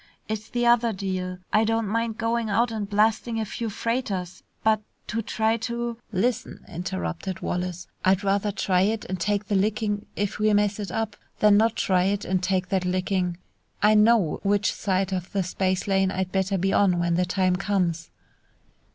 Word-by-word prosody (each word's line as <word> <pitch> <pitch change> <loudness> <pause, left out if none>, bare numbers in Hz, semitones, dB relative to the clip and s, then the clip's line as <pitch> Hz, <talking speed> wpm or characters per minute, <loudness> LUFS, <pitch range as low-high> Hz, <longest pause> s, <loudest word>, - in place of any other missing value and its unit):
"It's 215 0 -4
the 240 0 0
other 235 -1 +4
deal. 185 -2 -3 0.2
I 215 - +5
don't 225 0 0
mind 225 +1 -1
going 230 0 0
out 230 +3 +2
and 210 -3 -3
blasting 220 +2 +1
a 220 - -1
few 230 +2 -4
freighters, 205 -5 -3 0.2
but 220 -1 +3 0.2
to 225 - -2
try 220 +1 0
to 235 0 -3
" - - -39
"Lissen," 245 -1 -2
interrupted 170 - -4
Wallace, 180 0 -3 0.2
"I'd 190 +2 +3
rather 200 +1 +1
try 185 -2 +1
it 215 +3 0
and 185 0 -4
take 205 +3 0
the 205 - -3
licking 205 +1 0
if 205 0 -2
we 215 0 +3
mess 205 0 +2
it 205 - -4
up, 220 -2 -2 0.2
than 210 -1 +5
not 225 +2 +3
try 185 -1 +2
it 200 +1 0
and 185 0 0
take 185 0 0
that 190 -2 +1
licking. 180 -1 0 0.5
I 210 +1 +6
know 215 -5 +4
which 205 0 +1
side 190 -1 -1
of 180 -1 -3
the 195 -2 +1
space 185 +1 -1
lane 195 -1 +2
I'd 190 -1 -2
better 190 0 0
be 195 +2 +1
on 185 -3 +4
when 175 0 +1
the 180 +2 +2
time 185 0 +1
comes!" 180 -5 -1
200 Hz, 185 wpm, -25 LUFS, 185-220 Hz, 0.5 s, I